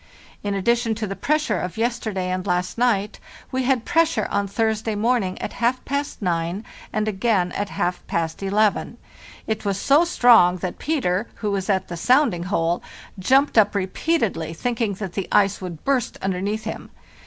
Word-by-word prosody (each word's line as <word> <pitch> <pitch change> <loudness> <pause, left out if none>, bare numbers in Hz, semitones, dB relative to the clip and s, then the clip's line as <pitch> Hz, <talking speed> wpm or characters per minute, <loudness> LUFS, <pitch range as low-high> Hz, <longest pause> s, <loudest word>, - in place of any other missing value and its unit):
In 205 -1 -2
addition 230 +3 +1
to 220 0 -3
the 195 -1 -4
press 305 +9 0
ure - - 0
of 180 +1 -5
yesterday 220 -6 -1
and 185 +1 -3
last 180 0 0
night, 215 -4 +1 0.3
we 260 0 -1
had 255 -3 +1
pressure 330 -1 +2
on 200 0 0
Thursday 220 +1 -1
morning 215 -3 0
at - - -5
half 245 +2 0
past 280 -4 -3
nine 175 +3 -1 0.3
and 215 0 -1
again 195 -3 +1
at 205 +1 -3
half 180 0 -2
past 165 0 -2
eleven. 205 +2 +1 0.5
It 220 -1 -2
was 200 -2 -1
so 285 +9 +4
strong 235 - +5
that 185 0 -5
Peter, 235 - 0
who 210 -2 -2
was 195 0 -2
at 190 -2 +1
the 170 - -6
sounding 245 - +3
hole, 175 -3 0 0.4
jumped 265 +5 +4
up 205 -1 +3
repeatedly, 190 - -1
thinking 230 0 -1
that 190 -2 -6
the 195 - -3
ice 200 -1 +3
would 175 -4 -7
burst 270 -4 0
underneath 195 +3 -1
him. - - -6
205 Hz, 175 wpm, -23 LUFS, 185-240 Hz, 0.5 s, strong